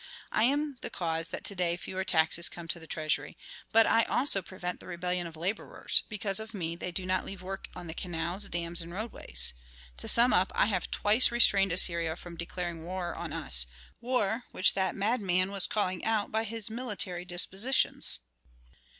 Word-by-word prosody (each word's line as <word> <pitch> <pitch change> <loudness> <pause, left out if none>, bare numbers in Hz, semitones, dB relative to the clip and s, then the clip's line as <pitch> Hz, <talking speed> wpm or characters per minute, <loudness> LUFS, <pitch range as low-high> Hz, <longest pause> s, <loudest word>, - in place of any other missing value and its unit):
I 215 - +2
am 285 0 -1
the - - -5
cause 165 -1 -3
that - - -7
to 200 - -2
day 175 -2 -1
fewer 190 +1 -5
taxes 165 -1 +3
come 170 -1 -10
to 170 - -3
the 165 - -12
treasury, 155 -2 -3 0.3
but 225 0 +5
I 230 - +3
also 245 -7 +3
prevent 180 -1 -6
the - - -13
rebellion 180 0 -3
of 165 - -11
laborers; 180 +7 -1
because 205 -2 -2
of 220 0 -9
me 170 -3 -4
they 180 +1 -6
do 180 +1 -3
not 185 0 -1
leave 195 -1 -9
work 195 +1 -6
on 180 - -9
the 160 - -6
canals, 175 +3 -3
dams, 170 0 +3
and 170 +1 -7
roadways. 65 - -1 0.4
To - - -6
sum 240 +2 +6
up, 185 +1 +2
I - - +3
have 195 -4 -2
twice 215 +5 +4
restrained 195 -5 +6
Assyria 170 -2 +3
from 175 0 -11
declaring 170 0 -5
war 180 0 -5
on - - -7
us, - - +3 0.3
war 240 -1 -1
which 185 - +5
that 190 -2 -1
madman 195 -3 0
was 200 -2 +1
calling 185 -4 -1
out 220 -2 0
by 220 +1 -1
his 225 0 -2
military 210 -7 -2
dispositions. 190 - +1
185 Hz, 185 wpm, -29 LUFS, 170-210 Hz, 0.4 s, sum